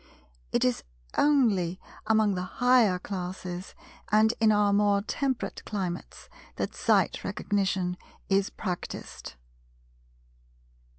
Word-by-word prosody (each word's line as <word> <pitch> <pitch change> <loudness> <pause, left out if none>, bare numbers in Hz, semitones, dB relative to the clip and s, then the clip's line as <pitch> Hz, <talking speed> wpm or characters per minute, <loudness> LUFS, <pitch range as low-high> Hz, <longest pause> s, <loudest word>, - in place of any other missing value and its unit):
It - - +2
is 125 -1 0 0.3
only 210 - +3 0.3
among 220 -2 +3
the 180 - -2
higher 230 0 +3
classes 180 -1 -6 0.4
and 215 +2 +5
in 220 -1 +5
our 205 -1 +3
more 200 -1 +3
temperate 260 +3 -2
climates 185 -4 -5 0.3
that - - -3
Sight - - +2
Recognition 190 -3 -1 0.3
is 195 0 +2
practised. 180 - -6
200 Hz, 100 wpm, -28 LUFS, 180-220 Hz, 0.4 s, and